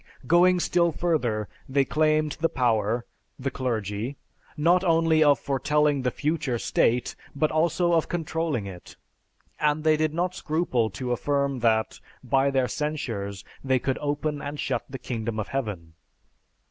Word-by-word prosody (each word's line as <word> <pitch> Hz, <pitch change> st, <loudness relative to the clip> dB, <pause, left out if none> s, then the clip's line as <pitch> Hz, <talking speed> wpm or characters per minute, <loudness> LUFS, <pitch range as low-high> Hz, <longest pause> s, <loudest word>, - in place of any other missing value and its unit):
Going 175 Hz, +5 st, +5 dB
still 170 Hz, -1 st, +2 dB
further, 125 Hz, -, 0 dB, 0.2 s
they 135 Hz, 0 st, +2 dB
claimed 155 Hz, 0 st, +2 dB
the 165 Hz, +1 st, +2 dB
power 115 Hz, -2 st, +1 dB, 0.3 s
(the 135 Hz, +1 st, -3 dB
clergy) 115 Hz, -1 st, -3 dB, 0.4 s
not 175 Hz, +4 st, +3 dB
only 165 Hz, -2 st, +4 dB
of 145 Hz, -2 st, +5 dB
foretelling 145 Hz, +1 st, +1 dB
the 125 Hz, -, +1 dB
future 150 Hz, -2 st, -1 dB
state, 120 Hz, +1 st, +1 dB, 0.2 s
but 155 Hz, +2 st, +1 dB
also 170 Hz, +2 st, +2 dB
of 165 Hz, -2 st, +2 dB
controlling 160 Hz, -8 st, -2 dB
it; 90 Hz, -3 st, -10 dB, 0.6 s
and 150 Hz, 0 st, +1 dB
they 155 Hz, -1 st, +4 dB
did 155 Hz, 0 st, 0 dB
not 180 Hz, +1 st, 0 dB
scruple 155 Hz, -10 st, 0 dB
to 125 Hz, +5 st, -4 dB
affirm 140 Hz, +1 st, 0 dB
that, 110 Hz, -2 st, +1 dB, 0.2 s
by 135 Hz, +2 st, +2 dB
their 135 Hz, -2 st, +1 dB
censures, 115 Hz, -11 st, -4 dB, 0.2 s
they 130 Hz, -1 st, +2 dB
could 130 Hz, +1 st, -2 dB
open 145 Hz, 0 st, -2 dB
and 145 Hz, +1 st, -5 dB
shut 125 Hz, -3 st, -1 dB
the 135 Hz, -, -5 dB
Kingdom 115 Hz, -3 st, -4 dB
of 105 Hz, -, -4 dB
Heaven. 105 Hz, -12 st, -4 dB
140 Hz, 145 wpm, -26 LUFS, 120-155 Hz, 0.6 s, Going